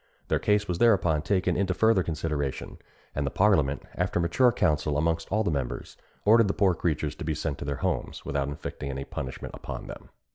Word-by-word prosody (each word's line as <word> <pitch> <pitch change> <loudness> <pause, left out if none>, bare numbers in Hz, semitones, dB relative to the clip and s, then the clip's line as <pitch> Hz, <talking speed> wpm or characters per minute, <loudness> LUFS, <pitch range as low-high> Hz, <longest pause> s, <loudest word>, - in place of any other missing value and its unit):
Their - - +2
case 105 0 +2
was 90 -1 -2
thereupon 95 -10 +4
taken 90 +1 +1
into 95 -1 0
further 110 -2 +4
consideration; 75 -4 -3 0.3
and 70 - -1
the 70 - 0
parliament, 75 -7 +2
after 90 0 0
mature 85 +9 +4
counsel 75 -8 +1
amongst 80 +2 0
all 110 +2 +2
the 100 - 0
members, 70 -4 -3 0.3
ordered 115 +1 +6
the 100 - -1
poor 95 -3 +3
creatures 75 -3 -1
to - - -6
be 80 -1 -1
sent 75 -1 -3
to - - -5
their 70 0 -2
homes, - - -2
without 70 -1 -1
inflicting 70 -1 -5
any 70 0 -4
punishment 65 -2 -6
upon - - -7
them." - - -10
85 Hz, 195 wpm, -27 LUFS, 75-100 Hz, 0.3 s, ordered